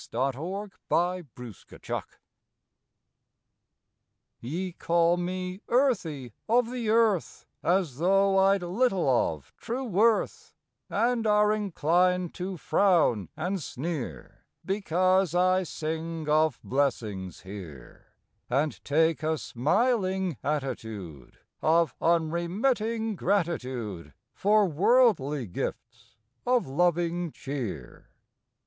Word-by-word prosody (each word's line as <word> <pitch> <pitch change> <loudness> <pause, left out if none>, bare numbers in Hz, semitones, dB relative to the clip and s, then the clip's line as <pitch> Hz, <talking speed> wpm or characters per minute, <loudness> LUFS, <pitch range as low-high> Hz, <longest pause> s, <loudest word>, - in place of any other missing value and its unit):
May 130 +4 +1
Fourth 190 +9 -5 0.2
A 180 +1 +1 0.2
TOAST 120 -5 -10
TO - - -13 0.2
EARTH - - -5 2.2
\7"E 175 +10 -3
call 170 +1 +3
me 185 +2 -4
"earthy 175 - 0 0.2
of 240 +1 +3
the 240 -3 -3
earth" 220 -5 +1 0.2
As 170 -7 0
though 195 +3 +3
I 195 +1 +5
d 175 - -7
little 190 - +1
of 80 - 0
true 250 +4 -4
worth, 230 - +1 0.3
And 235 -1 +1
are 210 0 +4
inclined 180 -3 +1
to 185 0 -5
frown 160 - +2
and 185 +2 -2
sneer 135 - -6 0.2
Because 185 -2 +1
I 185 +1 +3
sing 160 -1 -4
of 155 -3 +2
blessings 110 - -2
here, 90 -10 -11 0.4
And 140 +5 -1
take 160 +2 +2
a 155 0 0
smiling 190 - 0
attitude 110 - -4 0.2
Of 165 -3 +3
unremitting 205 +8 0
gratitude 130 - -2 0.2
For 205 +7 +3
"worldly" 165 - +3
gifts 90 - -6 0.3
of 250 -1 +2
loving 175 +3 0
cheer. 120 - -6
175 Hz, 100 wpm, -27 LUFS, 140-195 Hz, 2.2 s, I